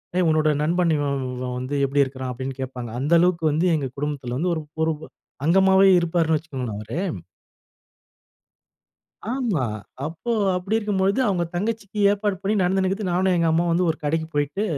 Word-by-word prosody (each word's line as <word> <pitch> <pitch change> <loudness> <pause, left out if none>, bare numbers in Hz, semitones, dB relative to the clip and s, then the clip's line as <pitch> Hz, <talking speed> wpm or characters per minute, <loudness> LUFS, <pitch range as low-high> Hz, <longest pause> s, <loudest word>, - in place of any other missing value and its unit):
"ஏய்! 180 - +3
உன்னோட 155 -1 +3
நண்பன் 170 +1 +2
இவன், 140 -1 -1 0.2
இவன் 125 0 -4
வந்து 130 +3 -4
எப்பிடி 140 +1 +3
இருக்கான்?" 130 -1 -5
அப்பிடின்னு 130 +2 -6
கேப்பாங்க. 125 -2 -5
அந்த 150 +4 +1
அளவுக்கு 170 -2 +2
வந்து 165 +5 +1
எங்க 140 -4 -2
குடும்பத்தில 140 -4 -3
வந்து 175 +4 0
ஒரு 160 - -4 0.2
ஒரு 160 - +1 0.5
அங்கமாவே 190 +2 +5
இருப்பார்ன்னு 165 -2 +1
வச்சுக்கோங்களேன். 130 -8 -5
அவரு. 125 +10 -5 2.3
ஆமா. 230 - 0 0.4
அப்போ 165 +9 -4 0.2
அப்பிடி 195 +5 0
இருக்கும் 210 -3 -1
பொழுது 200 +6 +2
அவுங்க 180 -3 +1
தங்கச்சிக்கு 210 +1 -3
ஏற்பாடு 205 -1 0
பண்ணி 205 +2 0
நடந்துன்னு 190 +1 +1
இருக்குது. 195 -1 -2
நானும் 185 +1 +2
எங்க 170 - +2
அம்மாவும் 170 +1 +2
வந்து 175 0 +2
ஒரு 160 - -10
கடைக்கு 160 +2 -1
போயிட்டு 145 +8 0
165 Hz, 160 wpm, -23 LUFS, 145-190 Hz, 2.3 s, அங்கமாவே